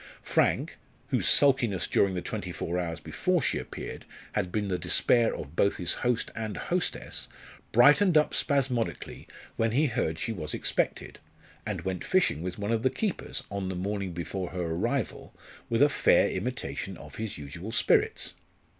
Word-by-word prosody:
Frank, -, -, +1 dB, 0.3 s
whose -, -, +1 dB
sulkiness 130 Hz, -, +4 dB
during 95 Hz, -1 st, +2 dB
the 90 Hz, -, -3 dB
twenty 100 Hz, -2 st, -4 dB
four 85 Hz, 0 st, -2 dB
hours 85 Hz, -2 st, -3 dB
before -, -, 0 dB
she -, -, 0 dB
appeared -, -, -7 dB, 0.3 s
had 90 Hz, -, -1 dB
been 105 Hz, 0 st, -1 dB
the 90 Hz, -2 st, -1 dB
despair 115 Hz, +7 st, +3 dB
of 75 Hz, +2 st, -8 dB
both 100 Hz, -, +2 dB
his 90 Hz, -, 0 dB
host 120 Hz, -1 st, 0 dB
and 110 Hz, -2 st, -4 dB
hostess, 180 Hz, 0 st, -2 dB, 0.4 s
brightened 150 Hz, -, +6 dB
up 150 Hz, -, +3 dB
spasmodically 130 Hz, -5 st, -1 dB, 0.3 s
when 115 Hz, -1 st, +1 dB
he 145 Hz, +5 st, +3 dB
heard 95 Hz, -, -1 dB
she 115 Hz, -, -2 dB
was 75 Hz, -8 st, -4 dB
expected, -, -, -1 dB, 0.5 s
and -, -, -2 dB
went 95 Hz, -1 st, -3 dB
fishing 185 Hz, -, +2 dB
with 90 Hz, 0 st, -4 dB
one 100 Hz, +1 st, -2 dB
of 115 Hz, -1 st, +1 dB
the 130 Hz, -, +3 dB
keepers, 210 Hz, +3 st, -3 dB
on 100 Hz, -2 st, -3 dB
the 95 Hz, -, -3 dB
morning 100 Hz, +1 st, -2 dB
before 90 Hz, +2 st, -4 dB
her 90 Hz, -1 st, -3 dB
arrival, 115 Hz, +9 st, -2 dB, 0.3 s
with 115 Hz, +4 st, +4 dB
a -, -, +7 dB
fair -, -, +4 dB
imitation -, -, -4 dB
of -, -, -11 dB
his 110 Hz, -2 st, -4 dB
usual 80 Hz, +9 st, -7 dB
spirits. 115 Hz, -, +2 dB
105 Hz, 165 wpm, -28 LUFS, 90-120 Hz, 0.5 s, a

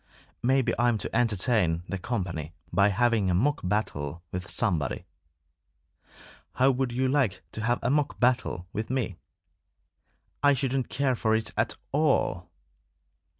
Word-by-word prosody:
"Maybe 130 Hz, +1 st, +2 dB
I'm 120 Hz, -1 st, +3 dB
to -, -, -5 dB
entertain 105 Hz, -6 st, +2 dB
the 95 Hz, -, -3 dB
company 90 Hz, -, -3 dB, 0.2 s
by 100 Hz, +1 st, +5 dB
having 110 Hz, -1 st, +2 dB
a 90 Hz, -, +2 dB
mock 140 Hz, +10 st, +2 dB
battle 85 Hz, -5 st, -2 dB
with 90 Hz, +1 st, -5 dB
somebody. 75 Hz, -9 st, -1 dB, 1.5 s
How 130 Hz, +2 st, +4 dB
would 130 Hz, -1 st, -1 dB
you 130 Hz, +2 st, 0 dB
like 130 Hz, -9 st, +1 dB
to 110 Hz, -, -6 dB
have 120 Hz, +1 st, +2 dB
a 120 Hz, -, +1 dB
mock 145 Hz, 0 st, 0 dB
battle 125 Hz, -8 st, +1 dB
with 110 Hz, +1 st, -3 dB
me?" 120 Hz, -8 st, -2 dB, 1.2 s
"I 145 Hz, -1 st, +5 dB
shouldn't 130 Hz, -1 st, -1 dB
care 135 Hz, -1 st, +1 dB
for 110 Hz, -1 st, +1 dB
it 110 Hz, 0 st, -2 dB
at 115 Hz, +2 st, 0 dB
all!" 140 Hz, -, +1 dB
115 Hz, 140 wpm, -27 LUFS, 95-130 Hz, 1.5 s, by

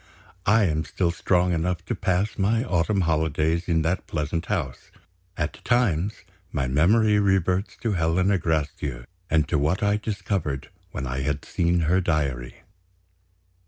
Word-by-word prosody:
I 110 Hz, +2 st, +5 dB
am 80 Hz, -4 st, +1 dB
still 85 Hz, 0 st, -1 dB
strong 90 Hz, +1 st, +1 dB
enough 90 Hz, +1 st, -1 dB
to -, -, -2 dB
pass 95 Hz, +2 st, 0 dB
my 110 Hz, +4 st, +2 dB
autumn 95 Hz, 0 st, +1 dB
holidays 80 Hz, 0 st, 0 dB
in 80 Hz, -2 st, +2 dB
that 85 Hz, +4 st, -1 dB
pleasant 80 Hz, +2 st, -2 dB
house. 80 Hz, -12 st, -3 dB, 0.5 s
At 80 Hz, 0 st, -3 dB
times, 105 Hz, -6 st, +1 dB, 0.3 s
my 70 Hz, -4 st, -1 dB
memory 105 Hz, -, +4 dB
reverts 95 Hz, -1 st, +1 dB
to 115 Hz, -2 st, 0 dB
Helena 90 Hz, +2 st, +2 dB
Gracedieu, 75 Hz, -6 st, -2 dB, 0.2 s
and 80 Hz, -1 st, +2 dB
to 80 Hz, -, +1 dB
what 80 Hz, +8 st, 0 dB
I 105 Hz, 0 st, +3 dB
discovered 100 Hz, -9 st, -3 dB, 0.2 s
when 70 Hz, -, -5 dB
I 65 Hz, +1 st, -3 dB
had 70 Hz, +2 st, -2 dB
seen 85 Hz, 0 st, +1 dB
her 85 Hz, +4 st, +2 dB
diary. 70 Hz, -8 st, -2 dB
85 Hz, 145 wpm, -25 LUFS, 75-95 Hz, 0.5 s, I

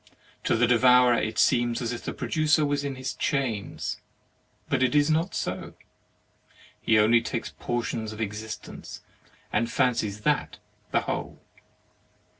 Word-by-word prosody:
To -, -, +3 dB
the 120 Hz, +2 st, +4 dB
devourer 125 Hz, +1 st, +5 dB
it 110 Hz, -2 st, -1 dB
seems 120 Hz, -1 st, +3 dB
as 120 Hz, -2 st, -2 dB
if 120 Hz, -, -7 dB
the -, -, -3 dB
pro -, -, -5 dB
ducer 155 Hz, -1 st, +3 dB
was 145 Hz, 0 st, 0 dB
in 140 Hz, -1 st, -3 dB
his 130 Hz, 0 st, -4 dB
chains; 115 Hz, -, -2 dB, 0.7 s
but -, -, 0 dB
it 130 Hz, +2 st, +2 dB
is 145 Hz, +1 st, +4 dB
not 165 Hz, +4 st, 0 dB
so, -, -, -4 dB, 1.1 s
he 110 Hz, -, +3 dB
only 115 Hz, +2 st, +5 dB
takes 115 Hz, 0 st, -4 dB
portions 115 Hz, -2 st, -2 dB
of 110 Hz, -, -9 dB
existence, 110 Hz, 0 st, -6 dB, 0.5 s
and 115 Hz, -, +1 dB
fancies 105 Hz, -4 st, 0 dB
that 150 Hz, +6 st, 0 dB, 0.3 s
the -, -, +2 dB
whole. -, -, -5 dB
120 Hz, 145 wpm, -26 LUFS, 110-140 Hz, 1.1 s, devourer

